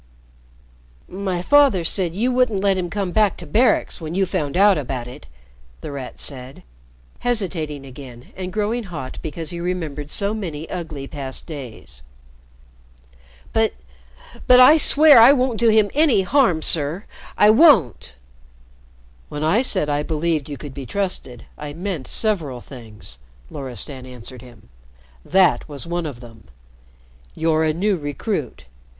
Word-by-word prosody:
"My 185 -2 -4
father 280 -8 +4
said 175 0 0
you 240 +6 0
wouldn't 245 -6 +1
let 195 -1 +3
him 180 -2 -3
come 195 0 -3
back 210 0 +2
to 175 - -9
Barracks 220 - +1
when 160 +1 -5
you 195 0 +2
found 170 -5 -3
out 200 0 +5
about 130 -5 -4
it," 125 - -12 0.5
The - - -7
Rat 135 -3 -8
said, 130 -1 -8 0.6
hesitating 170 - -2
again 130 -2 -12
and 185 -1 -6
growing 215 +4 -2
hot 155 -8 -7
because 160 +2 -4
he 170 - -6
remembered 160 -5 -4
so 200 +6 0
many 165 -8 -6
ugly 160 -6 -6
past 135 -2 -6
days. 130 - -9 1.5
"But 225 -1 +1 0.7
but 250 0 +7
I 275 +5 +8
swear 300 -2 +6
I 235 +5 +8
won't 255 -4 0
do 230 -1 +4
him 215 -2 +3
any 285 -10 +3
harm, 185 - +2
sir. 160 +5 +1 0.3
I 210 +1 +6
won't!" 215 - +4 1.1
"When 150 - -5
I 190 +10 +3
said 190 - -1
I 145 0 0
believed 155 -1 -2
you 145 - -6
could 145 -1 -9
be 135 -2 -8
trusted, 185 - -4
I 150 -1 -7
meant 170 -5 -5
several 165 - +1
things," 110 - -12 0.3
Loristan 130 0 -4
answered 125 0 -9
him. 120 - -17 0.5
"That 185 -3 +2
was 145 +2 -8
one 170 -1 -3
of 130 -5 -9
them. 115 -3 -14 0.9
You're 160 -1 +1
a 155 - +2
new 190 +5 0
recruit. 145 - -4
170 Hz, 145 wpm, -21 LUFS, 140-205 Hz, 1.5 s, I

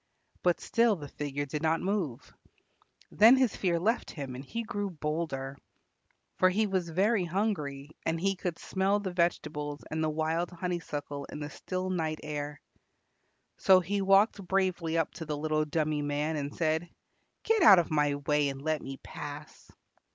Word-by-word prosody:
But 175 -1 +2
still 230 -2 +3
the 150 -5 -8
figure 145 0 -4
did 150 +2 -4
not 160 0 +2
move. 185 - -2 0.8
Then 225 +5 +7
his 260 -4 +2
fear 175 -3 +1
left 225 +7 0
him 140 -4 -6
and 130 +2 -7
he 230 +11 -4
grew 205 -3 -3
bolder, 150 -4 -3 0.8
for 185 - +6
he 210 +4 +2
was 185 -4 -1
very 195 +5 +2
hungry, 155 -7 -2
and 165 0 -1
he 195 +2 +1
could 175 -2 -3
smell 195 +2 0
the 190 -3 -4
vegetables 150 -4 -1
and 160 +1 -1
the 155 - +1
wild 160 +2 -1
honeysuckle 165 -5 -4
in - - -8
the 150 0 -5
still 185 0 -3
night 160 -3 -1
air. 145 -1 -4 1.0
So 190 -1 +7
he 195 +3 -1
walked 195 +1 +4
bravely 180 -3 +1
up 165 - 0
to 165 - -7
the 150 -1 -2
little 155 0 0
dummy 150 -1 0
man 145 +2 -1
and 145 -1 -3
said, 160 +2 0 0.5
"Get 450 -2 +2
out 200 - +9
of 170 -2 +1
my 150 -2 +2
way 145 0 +1
and 135 0 -6
let 155 +1 -1
me 135 0 -7
pass." - - -9
165 Hz, 170 wpm, -30 LUFS, 150-190 Hz, 1.0 s, out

